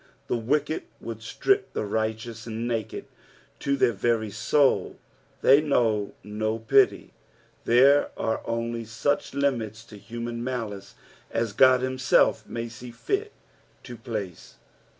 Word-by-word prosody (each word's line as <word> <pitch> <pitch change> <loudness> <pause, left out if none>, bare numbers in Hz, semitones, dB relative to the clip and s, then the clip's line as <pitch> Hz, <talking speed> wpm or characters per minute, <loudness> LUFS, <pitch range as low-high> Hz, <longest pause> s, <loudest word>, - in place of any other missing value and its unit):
The - - -1
wicked 145 +7 0 0.2
would 115 -1 -7
strip 395 - 0
the - - -2
righteous 110 +2 -3
naked 115 -1 -3 0.5
to 140 0 0
their 120 - +4
very 110 +1 0
soul: 135 +7 +2 0.5
they 140 +3 +7
know 115 -8 +1
no 110 +1 -2
pity. 110 -1 +2 0.5
Thero 135 +4 +5
are 110 - -1
only 115 0 -2
such 115 +6 -1
limits 115 -6 -1
to 105 -3 -13
human 115 +3 -5
niolice 110 -6 -5 0.4
as 115 -2 -1
God 130 +2 +6
himself 130 0 +2
may 115 - -4
aee 120 +1 -9
fit 400 - -2 0.5
to 125 - -8
pla< 115 -3 -3
e. 95 - -7
13. 90 - -19
115 Hz, 130 wpm, -26 LUFS, 110-130 Hz, 0.5 s, they